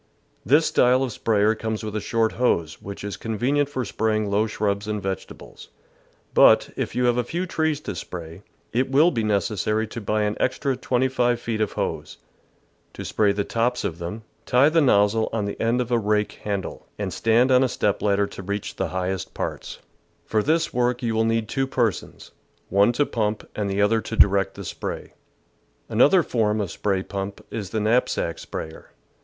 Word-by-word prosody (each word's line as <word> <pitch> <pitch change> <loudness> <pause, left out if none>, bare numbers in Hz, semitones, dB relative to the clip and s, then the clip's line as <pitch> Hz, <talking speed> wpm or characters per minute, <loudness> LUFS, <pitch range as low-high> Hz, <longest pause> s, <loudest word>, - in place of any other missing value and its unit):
This 145 - +4
style 125 +2 +3
of 130 - -2
sprayer 105 -1 +2
comes 110 0 -4
with 105 -1 -5
a 105 - -1
short 115 -5 +1
hose, 85 -10 0
which 100 0 -8
is 100 -1 -5
convenient 130 +6 0
for 130 -3 -3
spraying 110 -1 -1
low 105 +2 +2
shrubs 105 -1 -2
and 105 -1 -2
vegetables; 95 -2 -7 0.7
but, - - +6
if - - -3
you 125 - +2
have 120 0 +2
a 125 - +2
few 170 +9 -3
trees 160 -4 0
to - - -5
spray, 85 0 -8 0.3
it 130 +3 +1
will 150 +6 +5
be 115 -4 -1
necessary 105 +1 0
to 115 +1 -7
buy 105 +1 0
an 105 0 0
extra 130 +1 0
twenty 125 0 0
five 120 -2 +1
feet 115 -2 -3
of 105 - 0
hose. - - -4 0.8
To - - -7
spray 105 -2 +2
the 100 0 -1
tops 120 +4 -1
of 85 -5 -3
them, 90 +6 -6 0.2
tie 130 +4 +5
the 165 +1 +3
nozzle 110 -4 +3
on 110 -2 -1
the 100 - -5
end 115 +2 +2
of 125 0 -4
a 120 - +3
rake 105 0 +1
handle, 100 -3 -5
and - - -3
stand 115 +3 +3
on 130 0 +5
a 130 - +1
step 105 -3 0
ladder 100 0 +2
to 100 - -9
reach 100 +2 -4
the - - -1
highest 95 0 -3
parts. - - -4
THE - - -18
VEGETABLE - - -33
GARDEN - - -39
For 110 -1 +2
this 160 +2 +1
work 125 0 0
you 115 -1 0
will 110 0 +2
need 115 -1 0
two 135 +4 -1
persons 120 -7 -2 0.2
— - - -40
one 100 +4 +4
to 145 +4 +2
pump 110 -4 -2
and 105 -2 -2
the 100 +1 +1
other 110 +2 +2
to 115 - -5
direct 100 -1 +4
the 100 - -8
spray. - - -6 0.7
Another 145 - +4
form 110 -5 0
of 100 -5 -2
spray 95 +1 -1
pump 100 0 -6
is 105 -4 -4
the 110 - -2
knapsack 110 -6 +1
sprayer. 80 0 -7
110 Hz, 200 wpm, -24 LUFS, 100-125 Hz, 0.8 s, but